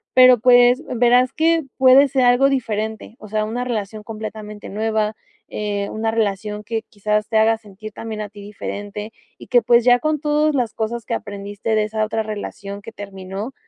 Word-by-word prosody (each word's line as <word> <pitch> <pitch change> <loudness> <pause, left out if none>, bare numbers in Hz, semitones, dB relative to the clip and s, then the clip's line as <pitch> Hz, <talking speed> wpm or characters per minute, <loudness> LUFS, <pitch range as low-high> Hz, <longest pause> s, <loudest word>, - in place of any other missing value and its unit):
pero, 255 -1 +8
pues, 245 +3 +5
verás 245 +2 +4
que 325 0 +2
puede 265 +2 +7
ser 265 -1 +1
algo 245 +3 +5
diferente. 220 -4 -3
O 215 - -11
sea, 215 0 0
una 235 +3 -3
relación 215 -3 -4
completamente 215 -1 -8
nueva, 215 +1 -1 0.3
eh, 205 -1 -3
una 220 +1 -1
relación 210 -1 -2
que 225 +1 -3
quizás 210 +1 -1
te 220 - +1
haga 220 +1 +4
sentir 215 0 -11
también 220 -1 -6
a 210 - -5
ti 205 0 -13
diferente 205 +1 -7 0.2
y - - -13
que, 245 -2 +4
pues, 240 -1 +4
ya 245 0 +6
con 310 +2 0
todas 300 0 +1
las 245 -4 0
cosas 225 0 -3
que - - -3
aprendiste 205 +1 -4
de 215 - +2
esa 215 0 -2
otra 220 +1 -1
relación 205 -1 -6
que 230 - -10
terminó. 200 +2 -7
220 Hz, 185 wpm, -20 LUFS, 210-245 Hz, 0.3 s, pero